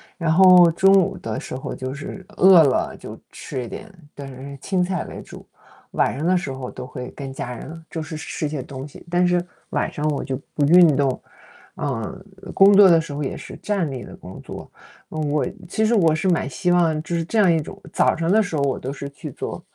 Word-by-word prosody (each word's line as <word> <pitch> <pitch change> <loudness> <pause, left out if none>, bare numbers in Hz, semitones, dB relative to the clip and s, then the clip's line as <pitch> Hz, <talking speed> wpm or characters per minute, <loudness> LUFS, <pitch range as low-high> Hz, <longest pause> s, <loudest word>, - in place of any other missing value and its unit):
然 165 -3 -1
后 180 0 +7
中 195 +4 +4
午 195 0 +3
的 110 -1 -5
时 - - -7
候 130 - -5
就 130 0 -5
是 150 +7 -8
饿 185 -2 +8
了 140 -4 +1
就 - - -10
吃 130 - -6
一 - - -7
点， 215 - -9 0.2
但 140 -1 -8
是 135 +1 -9
青 185 -2 0
菜 180 -1 -2
为 - - -9
主， - - -12 0.5
晚 - - +1
上 145 - -5
的 180 +2 +3
时 140 -6 -4
候 130 -1 -6
都 - - -8
会 125 0 -7
跟 135 -1 -7
家 125 -2 -5
人 165 +6 -9
就 165 - -5
是 155 +1 -6
吃 155 0 -4
些 145 -2 -4
东 135 +1 -8
西。 145 - -14
但 175 +1 +2
是 175 0 +1 0.3
晚 - - -1
上 150 +1 -3
我 145 - -2
就 130 -1 -4
不 145 - 0
运 170 -2 +7
动， 135 -2 0 0.5
啊， 140 +7 -4 0.4
工 195 +1 +6
作 205 - +9
的 165 -3 +5
时 160 - -9
候 145 +1 -4
也 135 - -3
是 - - -9
站 195 -7 -1
立 130 -3 -6
的 - - -11
工 - - -11
作。 - - -9 0.4
嗯， 155 -2 -2
我 145 -2 +1 0.2
其 220 +5 0
实 230 - +2
我 165 -8 +4
是 170 +4 0
蛮 170 -6 0
希 175 +6 -1
望 165 -3 +2
就 170 - -6
是 165 -1 -1
这 225 - -3
样 200 -5 +5
一 165 - +2
种 150 - -8
早 - - +2
上 165 +1 -1
的 220 +2 +5
时 180 -6 -3
候 145 - 0
我 140 -2 0
都 135 +2 -5
是 140 0 -7
去 140 - -9
做， - - -6
160 Hz, 255 characters per minute, -22 LUFS, 140-180 Hz, 0.5 s, 作